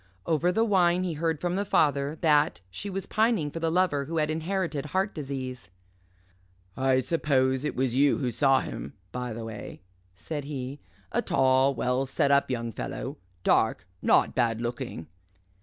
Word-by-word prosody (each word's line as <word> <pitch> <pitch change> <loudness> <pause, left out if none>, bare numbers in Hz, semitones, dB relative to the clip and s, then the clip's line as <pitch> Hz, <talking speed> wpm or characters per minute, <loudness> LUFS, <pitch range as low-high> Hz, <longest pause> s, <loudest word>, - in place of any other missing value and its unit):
Over 165 +2 +2
the 225 +5 +2
wine 180 -4 +3
he 180 -2 -1
heard 160 0 -1
from 175 +1 -1
the 200 - 0
father 145 -5 +2
that 150 - +3
she 150 - -5
was 195 0 -4
pining 215 -9 +1
for 165 - -5
the 165 0 0
Lover 165 -5 +1
who 165 +3 -4
had 155 0 +1
inherited 160 -2 -2
heart 190 +6 0
disease. 130 - -5 1.1
"I 130 0 +2
suppose 130 -2 +1
it 150 - -2
was 130 -2 0
you 140 +2 +4
who 125 -3 -1
saw 135 +3 +3
him, 70 - -6 0.2
by 125 -1 -4
the 115 0 -5
way," 105 -4 -8 0.3
said 145 - -5
he, 140 -1 -5 0.3
"a - - +1
tall, 130 +1 +3
well 125 +3 0
set 135 +1 +1
up 140 0 +4
young 115 -2 -2
fellow - - -5 0.3
dark - - +2 0.2
not - - +4
bad 115 -3 +1
looking." 120 - -4
140 Hz, 170 wpm, -27 LUFS, 130-165 Hz, 1.1 s, you